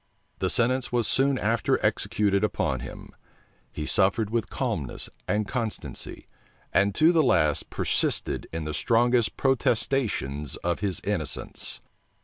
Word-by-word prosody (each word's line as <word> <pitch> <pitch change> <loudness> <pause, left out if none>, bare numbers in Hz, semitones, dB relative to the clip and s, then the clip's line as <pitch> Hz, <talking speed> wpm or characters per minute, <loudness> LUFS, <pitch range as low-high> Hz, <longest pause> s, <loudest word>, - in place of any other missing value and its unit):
The 95 - 0
sentence 125 +5 +1
was 120 -2 +1
soon 135 0 +3
after 115 0 +1
executed 100 -1 +1
upon 65 - 0
him.[*] - - -9 0.6
He 75 - -5
suffered 100 +5 +2
with 115 -2 -1
calmness - - -3 0.2
and 105 0 0
constancy, 115 -3 -5 0.5
and 100 0 +3
to 160 +2 +5
the 165 -2 +4
last 75 - +2
persisted - - 0
in 80 0 -4
the 75 - -3
strongest 120 +4 +2
protestations 110 - 0
of 85 -1 0
his 95 -5 -1
innocence. - - -2
110 Hz, 125 wpm, -26 LUFS, 95-125 Hz, 0.6 s, to